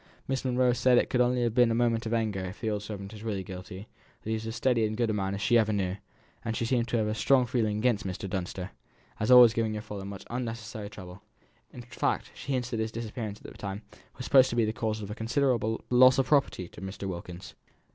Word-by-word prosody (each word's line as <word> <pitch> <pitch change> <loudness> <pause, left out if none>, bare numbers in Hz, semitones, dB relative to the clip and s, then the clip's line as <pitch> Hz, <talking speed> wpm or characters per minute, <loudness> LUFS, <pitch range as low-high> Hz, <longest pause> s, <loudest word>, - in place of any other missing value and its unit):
Miss 135 0 -1
Monro 125 -1 +2
says 125 0 +4
it - - +2
could 125 - +3
only 125 0 +2
have 120 -2 0
been 125 0 +5
done 115 - +1
in - - +1
a - - +4
moment 115 -1 0
of 110 - -2
anger 110 -4 -1
if 95 +3 -8
the 110 -2 -1
old 105 -1 -2
servant 100 -1 -7
is 105 - -10
really 105 -4 -3
guilty; 95 +2 -9 0.4
that 110 - -4
he - - +1
was 110 0 -3
as 110 - -4
steady 125 -3 +2
and 110 0 -1
good 120 -2 +1
a - - -1
man 95 -1 -1
as 100 - -6
she 120 +2 +4
ever 110 -1 +2
knew, 95 -3 -1 0.5
and 115 -1 -2
she 115 - -1
seems 120 0 +1
to 120 - 0
have 110 - +1
a 105 - -1
strong 130 +3 +3
feeling 115 -4 0
against 110 -1 +1
Mr. 95 +2 -5
Dunster, 95 0 -4 0.5
as 105 - -1
always 125 -3 +9
giving 110 -1 0
your 105 0 -5
father 105 -3 -7
much 100 0 -8
unnecessary 115 -3 -5
trouble; 95 -2 -11 0.5
in 125 - -10
fact, 120 - -2
she 140 - -7
hints 125 -2 -2
that 115 - -2
his 110 0 -1
disappearance 110 -2 -5
at - - -21
the - - -14
time 100 +1 -6 0.3
was - - -6
supposed 130 -1 +6
to - - -3
be 115 -2 +3
the 110 - -1
cause 110 -1 -2
of 100 - -6
a - - -2
considerable 115 -1 0
loss 130 +1 +7
of 135 - +3
property 140 - +1
to - - -13
Mr. 95 +1 -6
Wilkins." 90 +1 -7
110 Hz, 260 wpm, -28 LUFS, 100-120 Hz, 0.5 s, always